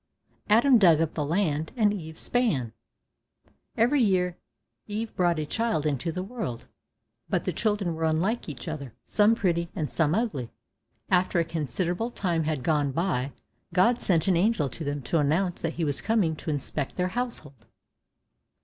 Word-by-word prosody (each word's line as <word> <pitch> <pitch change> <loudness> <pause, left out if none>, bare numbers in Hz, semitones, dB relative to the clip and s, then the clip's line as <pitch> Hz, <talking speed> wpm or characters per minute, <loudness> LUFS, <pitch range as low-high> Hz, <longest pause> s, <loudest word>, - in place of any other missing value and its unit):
Adam 235 +4 +6
dug 170 -6 +6
up 165 -1 0
the 150 - -1
land, 160 -1 0
and 210 -3 +3
Eve 160 -5 -7
span. 155 - 0 1.0
Every 255 +5 +3
year 180 -5 +2 0.5
Eve 220 +2 -4
brought 175 -2 +2
a 155 - -1
child 225 -2 -1
into 150 +3 -1
the 185 +3 -4
world; 195 - -5 0.6
but - - 0
the - - -2
children 205 -6 0
were 160 0 -2
unlike 170 +8 0
each 130 -4 -8
other, 140 -6 -6
some 215 +2 +4
pretty, 170 -5 0
and 155 -6 -2
some 160 0 +2
ugly. 175 - -1 0.6
After 185 0 +3
a - - +3
considerable 170 - -2
time 175 -8 -1
had 150 -4 -2
gone 145 -2 +1
by, 140 -4 -1 0.4
God 235 +7 +4
sent 170 -3 +2
an 190 - +4
angel 175 -6 +2
to 160 - -7
them, 145 -1 -3
to 165 +6 +1
announce 170 +5 +1
that 165 0 -2
he 165 - -1
was 145 -2 0
coming 205 -8 +1
to - - -6
inspect 145 -1 -2
their 180 0 0
household. 160 - -5
170 Hz, 165 wpm, -27 LUFS, 150-205 Hz, 1.0 s, Adam